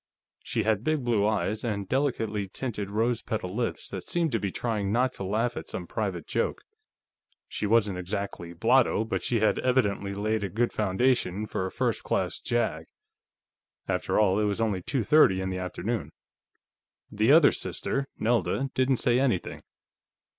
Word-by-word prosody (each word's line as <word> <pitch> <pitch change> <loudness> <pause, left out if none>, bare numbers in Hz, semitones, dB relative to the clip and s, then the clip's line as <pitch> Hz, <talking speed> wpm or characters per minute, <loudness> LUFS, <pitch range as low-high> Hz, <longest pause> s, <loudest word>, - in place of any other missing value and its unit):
She - - -2
had 110 -1 +1
big 155 -1 0
blue 110 -4 +2
eyes, 105 0 -1
and 100 -4 -2
delicately 115 -6 -1
tinted 105 -1 -4
rose 115 +3 0
petal 100 -4 -4
lips 120 0 -2
that 95 -2 -7
seemed 170 -3 +1
to 115 - +1
be 100 -1 -2
trying 105 -4 -2
not 125 +4 +2
to 100 - -7
laugh 115 +5 0
at - - -6
some - - -4
private - - -3
joke. - - -1 0.8
She 105 - -3
wasn't 105 -4 +2
exactly 90 -2 -4
blotto, 115 +5 +3
but 110 - -2
she 115 -3 0
had 110 - +3
evidently 100 -6 +1
laid 105 +1 -1
a 100 - -2
good 115 +6 0
foundation 105 -1 +1
for 95 -2 -2
a - - -7
first - - -1
class - - -1
jag. 110 -10 -1 1.0
After - - 0
all, 100 -1 +3
it 105 - +2
was 105 +1 -1
only 105 -5 0
two 130 +6 -1
thirty 105 -6 +5
in 95 0 -2
the 95 - -3
afternoon. 90 -2 -3 1.0
The 110 +5 +3
other 155 -1 +7
sister 135 0 -2
Nelda 120 +4 0
didn't 130 0 +2
say 120 +1 +2
anything. 125 -9 -1
110 Hz, 170 wpm, -27 LUFS, 100-120 Hz, 1.0 s, other